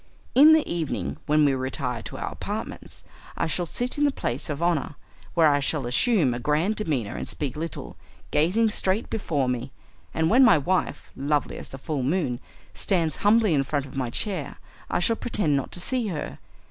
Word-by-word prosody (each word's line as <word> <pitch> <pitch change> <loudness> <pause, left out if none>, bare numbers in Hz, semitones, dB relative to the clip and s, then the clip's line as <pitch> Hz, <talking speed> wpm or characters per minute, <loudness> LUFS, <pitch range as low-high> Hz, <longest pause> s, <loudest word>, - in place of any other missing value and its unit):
In 300 +5 +8
the 315 -1 +3
evening, 165 -4 -2
when 150 0 +4
we 140 - +3
retire 130 -2 -3
to - - -8
our - - -4
apartments, - - -6 0.3
I - - +1
shall 170 +2 -1
sit 245 - -1
in - - +3
the 290 - +5
place 135 - -3
of 145 -1 -3
honour, 170 -4 0 0.4
where 165 -2 +6
I 145 - +2
shall 140 -1 -1
assume 145 - +2
a 120 - -4
grand 155 - +1
demeanour 140 - -2
and - - -4
speak 140 -5 -3
little, 165 +1 -6 0.3
gazing 200 +9 +3
straight 195 +2 0
before 150 -11 0
me, 125 +1 -2 0.4
and 160 0 +1
when 250 +9 +6
my 230 -8 +7
wife, 180 +6 -1
lovely 145 +2 -1
as - - -9
the 135 - -8
full 145 0 -3
moon, 130 -3 0 0.3
stands 170 -5 0
humbly 210 -2 +4
in 140 -2 +3
front 140 0 -2
of 135 - -12
my 130 -3 -1
chair 160 - -3 0.3
I - - +1
shall 200 +6 +2
pretend 185 -11 0
not 135 - -2
to - - -6
see 245 +4 -1
her. 165 -7 -5
155 Hz, 195 wpm, -25 LUFS, 135-200 Hz, 0.4 s, In